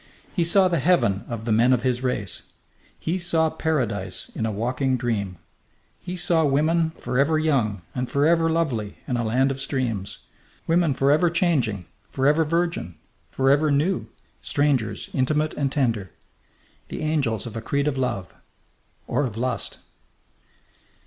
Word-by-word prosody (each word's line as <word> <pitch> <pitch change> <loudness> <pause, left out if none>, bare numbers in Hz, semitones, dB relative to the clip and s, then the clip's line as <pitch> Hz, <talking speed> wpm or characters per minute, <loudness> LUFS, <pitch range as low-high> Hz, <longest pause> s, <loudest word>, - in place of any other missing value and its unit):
He 175 - +1
saw 185 +3 +5
the 170 -3 +1
heaven 125 - +2
of 115 -2 -5
the 115 - -1
men 120 +4 +4
of 120 -2 +1
his 125 -1 0
race. 115 -7 -3 0.5
He 175 +4 -2
saw 165 -2 +1
Paradise 115 - -2
in 110 - -3
a - - -1
walking 125 +5 0
dream. 105 -7 -2 0.6
He 180 +1 -6
saw 170 -2 +2
women 155 +3 +2
forever 140 +5 +1
young 120 - +1
and 125 -1 -3
forever 165 +3 +3
lovely 135 -11 -1
in 125 - -1
a 120 - 0
land 130 +5 +2
of 135 0 -4
streams, 120 -8 -2 0.5
women 165 -4 +2
forever 145 +6 +3
changing, 140 - +1 0.2
forever 145 +4 +3
virgin, 165 - -1 0.3
forever 140 +3 +3
new; 150 +7 +1 0.3
strangers 130 -8 0
intimate 150 +4 +1
and 140 -2 -1
tender. 115 -9 0 0.8
The - - -6
angels 140 -9 0
of 115 - -7
a 115 - -3
creed 140 +5 0
of 145 - 0
love 125 -9 -2 0.7
or 145 - 0
of 110 -2 -8
lust! 125 0 -2
135 Hz, 145 wpm, -24 LUFS, 115-160 Hz, 0.8 s, saw